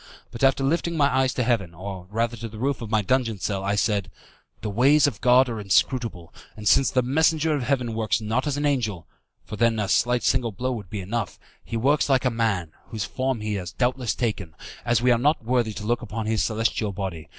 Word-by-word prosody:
But 115 - -6
after 135 0 +3
lifting 170 +3 0
my 140 -3 +3
eyes 130 -1 +2
to 125 - +1
heaven, 105 -8 0
or 95 0 -7
rather 115 +3 -1
to 115 +1 -6
the 110 - -11
roof 135 +3 -1
of 115 - -6
my 110 -2 +1
dungeon 120 -1 0
cell, 95 +2 -2
I 100 +1 0
said, 100 -2 0 0.5
"The 110 - -3
ways 135 +7 +4
of 120 -9 -2
God 125 +2 +5
are 115 -3 -4
inscrutable; 100 - 0 0.2
and 105 -1 -5
since 135 - +5
the 130 -2 +1
messenger 160 +4 +2
of 145 - -1
Heaven 125 -2 -1
works 110 -1 0
not 115 +6 -1
as 145 -1 -1
an 145 - -1
angel 110 - -1 0.4
(for 105 - -7
then 115 0 +2
a 105 -2 -1
slight 120 +3 +2
single 125 -3 +1
blow 125 +6 -3
would 105 -7 -6
be 105 - -4
enough), 105 +1 -3 0.3
he 115 - -4
works 140 +6 +2
like 135 -1 +2
a 125 - +3
man, 110 -8 -1 0.2
whose 110 -3 -4
form 130 -3 -2
he 105 0 -2
has 90 -4 -4
doubtless 125 -2 0
taken, 105 -9 -3 0.3
as 120 -1 +2
we 125 - +5
are 120 - +3
not 145 -2 +1
worthy 120 -2 +1
to 105 - -7
look 120 +2 0
upon 110 0 -5
his 110 0 0
celestial 110 -1 0
body. 90 -6 -5
115 Hz, 230 wpm, -24 LUFS, 105-130 Hz, 0.5 s, God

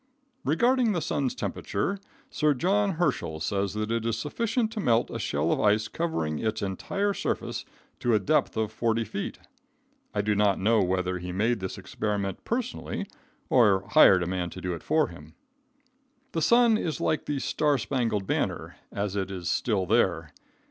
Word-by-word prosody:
Regarding 240 - +3
the 175 - 0
sun's 140 -4 -1
temperature, 185 - -2 0.3
Sir 150 -1 +2
John 195 +7 +2
Herschel 155 - -1
says 100 +5 -1
that 110 +1 -2
it 115 -1 0
is 115 -1 -1
sufficient 220 - -1
to 225 - -5
melt 120 - +2
a - - -4
shell 75 +3 0
of - - +1
ice 105 +1 +3
covering 110 - -2
its 110 -1 -2
entire 195 - -1
surface - - -3 0.3
to 120 -2 +2
a - - +4
depth 150 +3 +1
of 110 -1 0
40 115 0 0
feet. 105 -2 -5 0.7
I 105 - -1
do 105 +1 +1
not 100 -1 +3
know 110 +3 +3
whether 90 0 0
he 90 +1 -5
made 110 +5 +1
this 95 -1 -5
experiment 100 -3 -3
personally 235 -3 -3 0.4
or 105 -6 +4
hired 90 -2 +7
a - - -2
man 90 0 -2
to 95 - -9
do 90 0 -2
it 85 - -6
for 155 -1 +2
him. - - -13 1.0
The 165 - -1
sun 235 +2 +5
is 160 - -2
like 155 - 0
the 145 - -1
star 145 +1 +1
spangled 110 -2 -1
banner - - -2
as 100 -1 -3
it 95 -2 -1
is 90 -3 -4
"still 105 -6 0
there." 90 -7 +1
110 Hz, 175 wpm, -27 LUFS, 95-155 Hz, 1.0 s, hired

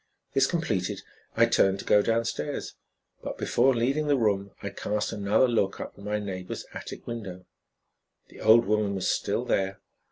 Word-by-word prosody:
This 135 -1 +4
completed, 110 - -1 0.3
I - - +7
turned 95 0 +3
to - - -8
go 105 - +5
downstairs. 115 +6 -2 0.5
But - - -5
before 130 +2 +2
leaving 135 +6 +1
the 145 -1 +3
room 100 -4 +1
I 100 - -3
cast 105 +1 -2
another 105 +5 +2
look 105 -5 0
up - - -6
at 100 - -14
my 105 +1 -1
neighbor's 95 -3 -5
attic - - -8
window. 95 -6 -6 0.8
The - - -13
old 115 +2 +6
woman 105 -1 +1
was 95 - -1
still - - 0
there. 95 0 0
105 Hz, 165 wpm, -27 LUFS, 100-120 Hz, 0.8 s, I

